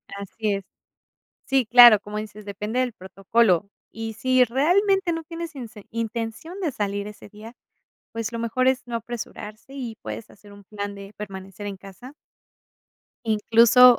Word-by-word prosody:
Así 200 +1 -2
es. 195 - -5 0.8
Sí 265 -4 +2
claro, 240 -3 +9
como 210 +1 -6
dices 215 -1 -7
depende 210 +4 -2
del 250 -2 0
protocolo, 195 0 +1 0.2
y 225 0 -5
si 255 +2 +4
realmente 355 - +2
no 330 0 -3
tienes 330 0 -7
inse 230 -5 -9
intención 230 - -4
de 320 -7 -1
salir 205 -1 -2
ese 210 0 -10
día, 215 +4 -12 0.6
pues, 230 0 -3
lo 230 - -4
mejor 245 +3 +1
es 260 -1 +3
no 235 - -4
apresurarse 230 +1 -7
y 245 -5 -5
puedes 110 +1 -7
hacer 205 0 -16
un 200 0 -14
plan 205 0 -5
de 200 +1 -10
permanecer 195 0 -7
en 195 -1 -5
casa 200 +8 -12 1.1
incluso 230 +3 +6
225 Hz, 155 wpm, -24 LUFS, 205-250 Hz, 1.1 s, claro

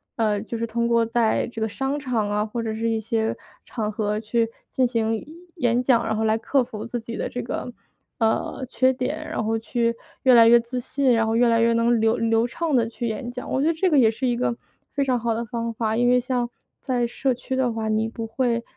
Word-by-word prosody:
呃， 210 -3 +1
就 230 +1 -5
是 230 - -1
通 235 +1 -1
过 230 -1 +3
在 230 -1 +1
这 225 -2 -6
个 220 - 0
商 270 +6 -2
场 245 -6 -1
啊， 210 0 +1
或 230 +2 -4
者 220 -1 -2
是 230 +1 -1
一 225 -1 0
些 220 0 -1 0.3
场 215 -3 -3
合 210 0 -1
去 225 +1 0 0.2
进 255 -1 +2
行 225 -2 -1 0.3
演 245 -4 +2
讲， 240 -2 +3
然 220 - 0
后 220 - 0
来 220 0 +3
克 265 +3 +2
服 220 -2 -7
自 240 0 -4
己 230 0 -7
的 - - -2
这 245 - -4
个， 245 +1 -4 0.5
呃， 225 +3 0
缺 260 0 +3
点， 295 +5 -3
然 - - -2
后 225 +1 0
去 235 0 0 0.3
越 260 - +6
来 230 -1 +8
越 235 +1 +7
自 250 +2 -4
信， 265 +1 +1
然 225 -1 +2
后 225 - 0
越 240 +1 +4
来 230 0 +3
越 230 0 +4
能 230 0 +2
流 225 +1 +3
流 225 +1 +2
畅 315 +4 -1
地 230 -2 +2
去 235 +1 -4
演 240 +2 -4
讲。 250 - -7
我 265 - +1
觉 305 - +2
得 330 - +3
这 365 +4 +1
个 290 - +5
也 225 - +6
是 225 +4 -3
一 245 -1 +2
个 240 -1 0 0.4
非 280 - +1
常 255 -2 +1
好 230 -1 0
的 235 - -3
方 230 0 -3
法， 220 -1 -1
因 245 +1 +3
为 250 0 +5
像 245 -1 -1 0.3
在 245 -2 0
社 255 +2 -1
区 260 +1 -4
的 260 -2 +1
话， 225 -1 -3
你 220 +1 0
不 225 0 -5
会 235 0 0
235 Hz, 265 characters per minute, -24 LUFS, 225-250 Hz, 0.5 s, 来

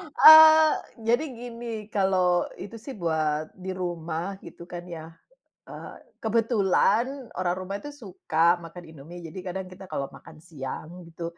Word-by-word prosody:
Eee, 315 0 +9 0.4
jadi 240 +6 +3
gini, 240 0 -8 0.3
kalau 185 -3 +2 0.2
itu 205 +3 -8
sih 275 - -6
buat 155 -2 -1
di 190 - -5
rumah 170 +2 -4
gitu - - -11
kan 175 0 -7
ya. 160 - -8 0.7
Eee, - - -9 0.3
kebetulan 230 +3 +1
orang 180 -1 0
rumah 185 +1 -5
itu 290 - -8
suka 175 -3 +1
makan 170 +1 -10
Indomie, 160 +3 -11
jadi 185 +4 -9
kadang 190 +1 -4
kita 190 +1 -11
kalau 140 - -3
makan - - -14
siang 155 -2 -7 0.2
gitu, 165 +1 -9
185 Hz, 140 wpm, -26 LUFS, 165-225 Hz, 0.7 s, Eee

